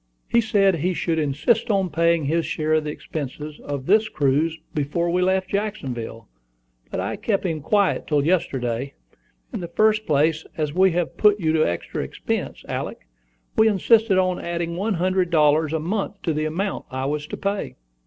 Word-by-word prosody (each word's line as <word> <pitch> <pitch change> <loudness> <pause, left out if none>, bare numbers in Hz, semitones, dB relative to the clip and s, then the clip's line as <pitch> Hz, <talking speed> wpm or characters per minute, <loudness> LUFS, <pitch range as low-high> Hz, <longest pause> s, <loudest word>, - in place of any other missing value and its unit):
"He 235 - +3
said 200 -4 +3
he 180 +4 0
should 165 -1 0
insist 155 - +1
on 195 -4 +1
paying 170 0 +2
his 165 +4 +1
share 155 0 -1
of 155 -1 +2
the - - -2
expenses 150 0 -6
of 140 -2 -5
this 215 +4 +3
cruise 155 0 +1 0.2
before 170 +3 -1
we 180 +1 +1
left 190 0 +1
Jacksonville; 135 - -4 0.6
but - - -3
I - - -2
kept 200 -3 -1
him 160 -4 -1
quiet 200 +5 +1
till 145 -2 +1
yesterday. 135 -7 -1 0.6
In - - -3
the 175 - -5
first 215 +4 +2
place, 155 +2 +2
as 150 -2 -1
we 190 +2 +5
have 175 -1 -2
put 210 -1 +4
you 160 -3 +1
to 155 -1 +3
extra 85 - -4
expense, - - -4
Alick, - - -5 0.5
we 220 - +6
insisted 220 0 +4
on 185 -1 +1
adding 170 0 -3
one 200 +3 -1
hundred 185 +1 +1
dollars 155 -1 +3
a 160 - 0
month 195 +4 -3
to 165 - 0
the 155 +1 -1
amount 190 +6 -2
I 130 0 -3
was 150 +1 -2
to - - -6
pay." 200 0 -3
170 Hz, 185 wpm, -23 LUFS, 150-195 Hz, 0.6 s, we